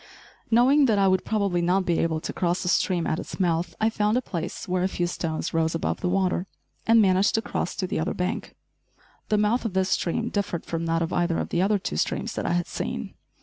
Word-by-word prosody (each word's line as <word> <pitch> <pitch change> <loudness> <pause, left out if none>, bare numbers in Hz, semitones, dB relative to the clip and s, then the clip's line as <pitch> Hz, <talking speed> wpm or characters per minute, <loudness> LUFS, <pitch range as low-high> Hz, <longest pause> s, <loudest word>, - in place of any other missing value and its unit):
Knowing 260 +5 +5
that 220 -3 +3
I 195 -1 +4
would 185 -1 +2
probably 200 -5 0
not 180 +2 +2
be 170 -2 +1
able 160 -1 0
to - - -5
cross 175 0 0
the - - -3
stream 175 -1 +1
at 160 - -1
its - - -7
mouth, 170 -1 0
I 220 +1 +2
found 210 +1 +1
a - - +1
place 170 -4 -5
where 180 0 0
a 185 - +2
few 175 -2 -1
stones 165 -2 -3
rose 165 0 +1
above 165 - -2
the 180 - 0
water, 185 0 0 0.4
and 230 0 +6
managed 190 -1 +4
to 225 - +2
cross - - -3
to 190 - -2
the 180 - -2
other 160 +4 -1
bank. 180 +1 -3 0.7
The 210 - +3
mouth 210 +4 +2
of 225 -5 -3
this 190 0 +1
stream 225 +7 0
differed 200 -5 -2
from 165 0 -3
that 165 0 +1
of 165 - -3
either 170 -1 +1
of - - -2
the 170 - 0
other 205 +2 +3
two 130 - -4
streams - - -1
that - - -3
I - - +1
had 175 0 +1
seen. - - -4
185 Hz, 240 wpm, -25 LUFS, 170-205 Hz, 0.7 s, and